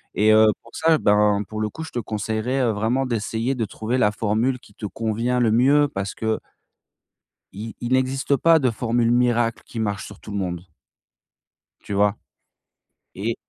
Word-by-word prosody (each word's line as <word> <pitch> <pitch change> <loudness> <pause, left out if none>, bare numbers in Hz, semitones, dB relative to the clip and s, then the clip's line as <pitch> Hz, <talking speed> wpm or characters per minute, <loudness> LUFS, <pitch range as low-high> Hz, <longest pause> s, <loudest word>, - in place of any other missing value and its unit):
Et, 110 +1 +4
heu, 110 0 +6
pour 115 - -16
ça, 160 0 +3
ben, 105 0 +3
pour 110 - -5
le 110 0 -1
coup, 160 - -8
je 160 - -8
te - - -6
conseillerais, 110 +4 -2
heu, 120 - +2
vraiment 115 +6 0
d'essayer 115 +2 -1
de 115 - -1
trouver 110 +4 -3
la 105 -4 +3
formule 110 +5 0
qui 100 -5 -20
te - - -7
convient 115 +4 -1
le 115 -3 +3
mieux 140 +6 +4
parce 100 -4 -4
que 110 0 -1 1.2
i 110 +3 -7
il 120 +2 -2
n'existe 130 +2 +1
pas 165 +3 +5
de 130 -5 +1
formule 115 +1 0
miracle 120 -2 +2
qui 115 - -8
marche 100 -4 -2
sur 100 - -12
tout 105 - -10
le 100 - -3
monde. 90 -3 -3 1.2
Tu 100 - -6
vois? 100 +1 +2 1.0
Et, 110 +4 -2
115 Hz, 180 wpm, -23 LUFS, 105-125 Hz, 1.2 s, heu